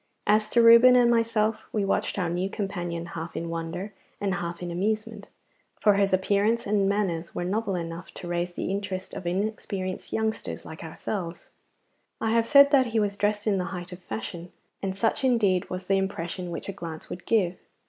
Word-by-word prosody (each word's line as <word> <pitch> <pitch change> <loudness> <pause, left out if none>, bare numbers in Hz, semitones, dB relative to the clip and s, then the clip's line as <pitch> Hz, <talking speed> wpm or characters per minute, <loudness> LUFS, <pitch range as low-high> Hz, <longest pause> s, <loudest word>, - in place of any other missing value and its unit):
As 215 +1 +3
to 235 +1 +4
Reuben 235 +2 +9
and 240 -1 +5
myself, 225 -2 +1
we 210 -2 0
watched 195 - 0
our 180 -3 0
new 175 +3 -1
companion 175 -5 -3
half 165 -1 -7
in 170 - -3
wonder 170 +5 -4 0.3
and 200 -2 0
half 170 -1 -4
in 175 - -4
amusement, 215 +5 -2 0.5
for 210 - +5
his 200 0 +2
appearance 205 +5 +2
and 200 -1 +2
manners 180 -5 -1
were - - -2
novel 205 +1 -1
enough 170 0 -5
to 175 - -7
raise 175 0 -1
the 185 - -3
interest 195 -1 -4
of 175 - -5
inexperienced 190 0 -3
youngsters 220 0 -2
like 160 - -9
ourselves. 170 +2 -5 0.7
I 220 - 0
have 230 0 +2
said 280 -1 +7
that 265 -3 +5
he 225 -1 0
was 205 -1 0
dressed 205 0 0
in 200 -3 +2
the 180 - -1
height 175 0 -6
of 180 - -8
fashion, 170 +5 -6 0.3
and 190 -1 -2
such 225 +6 0
indeed 210 -8 +2
was 185 0 -5
the 195 +1 +2
impression 180 -2 -3
which 170 - -5
a 195 - -4
glance 165 -4 -7
would 180 - -7
give. 185 -6 +2
195 Hz, 190 wpm, -26 LUFS, 175-215 Hz, 0.7 s, Reuben